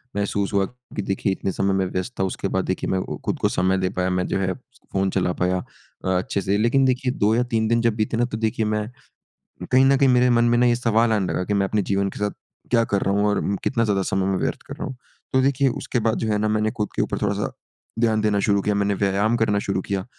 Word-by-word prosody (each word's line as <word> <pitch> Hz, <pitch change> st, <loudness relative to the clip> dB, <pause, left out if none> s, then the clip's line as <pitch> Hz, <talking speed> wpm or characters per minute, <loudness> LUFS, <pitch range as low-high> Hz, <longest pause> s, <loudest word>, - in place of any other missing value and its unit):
महसूस 100 Hz, -1 st, -1 dB
हुआ 100 Hz, -1 st, +3 dB
कि 125 Hz, 0 st, -8 dB
देखिए 95 Hz, 0 st, -1 dB
इतने 95 Hz, 0 st, -2 dB
समय 95 Hz, +1 st, 0 dB
मैं 95 Hz, -1 st, +1 dB
व्यस्त 95 Hz, +7 st, -3 dB
था -, -, +2 dB
उसके 95 Hz, +1 st, -2 dB
बाद 95 Hz, 0 st, -1 dB
देखिए 95 Hz, -, -2 dB
मैं 95 Hz, -, +1 dB
वो -, -, -5 dB
खुद -, -, -1 dB
को -, -, +2 dB
समय 95 Hz, +1 st, +1 dB
दे 95 Hz, -1 st, 0 dB
पाया 90 Hz, 0 st, +1 dB
मैं 90 Hz, 0 st, 0 dB
जो -, -, -1 dB
है 95 Hz, -1 st, 0 dB
फ़ोन 115 Hz, -7 st, -4 dB
चला 90 Hz, -2 st, 0 dB
पाया 90 Hz, +1 st, 0 dB, 0.5 s
अ, -, -, -1 dB
अच्छे 95 Hz, +2 st, -2 dB
से। 100 Hz, +2 st, 0 dB
लेकिन 130 Hz, +5 st, +3 dB
देखिए 130 Hz, 0 st, +1 dB
2 105 Hz, +2 st, +3 dB
या 125 Hz, -, +2 dB
3 110 Hz, -1 st, +2 dB
दिन 115 Hz, +1 st, +2 dB
जब 115 Hz, -2 st, +1 dB
बीते 110 Hz, +1 st, -1 dB
ना 120 Hz, -, +2 dB
तो 110 Hz, -, -2 dB
देखिए 110 Hz, 0 st, 0 dB
मैं 105 Hz, 0 st, -1 dB, 0.9 s
कहीं 130 Hz, +1 st, +6 dB
ना 135 Hz, 0 st, +5 dB
कहीं 135 Hz, -1 st, +4 dB
मेरे 125 Hz, 0 st, +4 dB
मन 120 Hz, 0 st, +4 dB
में 120 Hz, 0 st, +3 dB
ना 125 Hz, -, +4 dB
ये 120 Hz, -1 st, +3 dB
सवाल 115 Hz, -1 st, +2 dB
आने 100 Hz, -4 st, 0 dB
लगा 90 Hz, -, -1 dB
कि 105 Hz, -, -1 dB
मैं 100 Hz, -1 st, +2 dB
अपने 105 Hz, 0 st, +1 dB
जीवन 100 Hz, 0 st, +1 dB
के -, -, -10 dB
साथ 105 Hz, 0 st, 0 dB, 0.4 s
क्या 115 Hz, -1 st, +4 dB
कर 100 Hz, -2 st, 0 dB
रहा 100 Hz, -, +1 dB
हूँ? 100 Hz, +1 st, +2 dB
और 100 Hz, -1 st, 0 dB
कितना 115 Hz, -3 st, +1 dB
ज़्यादा 100 Hz, -2 st, +1 dB
समय 95 Hz, 0 st, 0 dB
मैं 95 Hz, -1 st, +1 dB
व्यर्थ -, -, -2 dB
कर -, -, -7 dB
रहा -, -, -5 dB
हूँ? 130 Hz, -, -8 dB, 0.4 s
तो 130 Hz, -, +4 dB
देखिए 135 Hz, 0 st, +2 dB
उसके 125 Hz, 0 st, -2 dB
बाद 110 Hz, -, 0 dB
जो 115 Hz, -, -2 dB
है 105 Hz, -, +1 dB
ना 110 Hz, +1 st, 0 dB
मैंने 110 Hz, 0 st, +1 dB
खुद 105 Hz, -4 st, -3 dB
के -, -, +2 dB
ऊपर -, -, -2 dB
थोड़ा-सा -, -, -1 dB, 0.5 s
ध्यान 110 Hz, -2 st, +2 dB
देना 105 Hz, -1 st, +1 dB
शुरू 100 Hz, -1 st, +3 dB
किया 105 Hz, -, 0 dB
मैंने 100 Hz, 0 st, +1 dB
व्यायाम 100 Hz, +4 st, +1 dB
करना 105 Hz, -3 st, +1 dB
शुरू 100 Hz, -2 st, -1 dB
किया। 95 Hz, -2 st, -3 dB
105 Hz, 270 wpm, -23 LUFS, 95-115 Hz, 0.9 s, कहीं